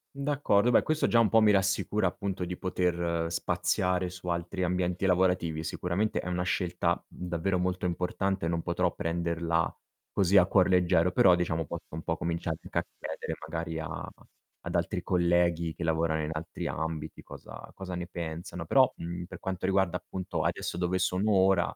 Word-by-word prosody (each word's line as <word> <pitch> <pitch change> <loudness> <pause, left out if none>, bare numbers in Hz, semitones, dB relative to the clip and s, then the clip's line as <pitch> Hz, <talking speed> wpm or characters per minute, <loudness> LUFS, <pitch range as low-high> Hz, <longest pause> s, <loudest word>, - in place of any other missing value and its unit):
D'accordo. 140 -6 +2
Beh, 125 - +5
questo 155 0 +1
già 115 - +4
un 115 - +5
po' 115 - +5
mi 105 -1 +6
rassicura 95 +1 +1
appunto 95 0 -2
di 90 +1 -4
poter 85 -2 -1
spaziare 90 0 0
su 90 0 -10
altri 85 +2 -2
ambienti 90 +1 0
lavorativi. 90 -3 +2
Sicuramente 90 +6 -1
è - - -5
una 90 0 -1
scelta, 90 -1 0
mhmm, 90 - -7
davvero 90 +2 0
molto 90 0 -1
importante, 90 +1 -1
non 85 0 0
potrò 85 +1 0
prenderla 85 0 -1 0.4
così 100 0 +3
a 90 - +7
cuor 95 -1 +4
leggero, 90 -1 +3
però 90 0 +6
diciamo 80 -2 0
posso 85 +3 -7
un 80 - -5
po' 80 - -1
cominciare 85 -1 -2
anche 90 0 -6
a 85 - +2 0.2
chiedere - - -4
magari 80 0 -3
a 80 - -5 0.6
ad - - -3
altri - - 0
colleghi 85 -2 +2
che 85 - -6
lavorano 80 -1 +1
in 75 - -2
altri 80 +1 -5
ambiti 80 -1 -4
cosa - - -10
cosa 95 -2 -6
ne 90 0 -3
pensano, 85 0 -6
però, 130 +6 +5
mhmm, 85 +1 -5
per - - -10
quanto 95 -1 -3
riguarda, 95 -2 +2
appunto, 90 -4 -4
adesso 85 +2 -2
dove 90 +1 0
sono 95 +4 +1
ora, 95 -2 +3
90 Hz, 175 wpm, -29 LUFS, 85-95 Hz, 0.6 s, a